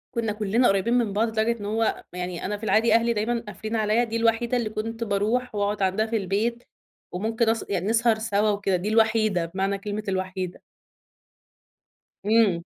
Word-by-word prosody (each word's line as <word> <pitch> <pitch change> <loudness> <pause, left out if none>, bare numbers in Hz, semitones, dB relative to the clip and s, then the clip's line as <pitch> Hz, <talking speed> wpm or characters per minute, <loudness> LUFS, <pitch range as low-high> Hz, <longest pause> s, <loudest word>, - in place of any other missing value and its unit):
كنّا 225 -2 0
كلّنا 215 +4 +2
قريبين 195 +4 +2
من 235 -5 +1
بعض 225 +3 +2
لدرجة 225 +1 0
إن 205 - -6
هو 220 +2 0
يعني 180 -1 -4
أنا 205 +2 -2
في 215 - -15
العادي 220 +3 +3
أهلي 230 +1 +3
دايمًا 230 +2 -1
قافلين 215 +3 -5
عليَّ، 220 +2 +2
دي 225 - -5
الوحيدة 230 +2 +1
اللي 230 -3 -1
كنت 225 +2 -4
باروح 220 +3 -1
واقعد 205 0 -1
عندها 190 +4 +1
في 225 0 -1
البيت 215 +5 -1 0.5
وممكن 225 +5 0
أس 225 0 0
يعني 190 0 -1
نسهر 225 0 +3
سوا 215 -1 +1
وكده، 200 -2 0
دي 180 +4 -2
الوحيدة 220 -5 +2
بمعنى 195 +3 -2
كلمة 210 +1 -5
الوحيدة. 185 -1 -3 1.6
إمم. 210 -6 +3
215 Hz, 175 wpm, -25 LUFS, 200-230 Hz, 1.6 s, العادي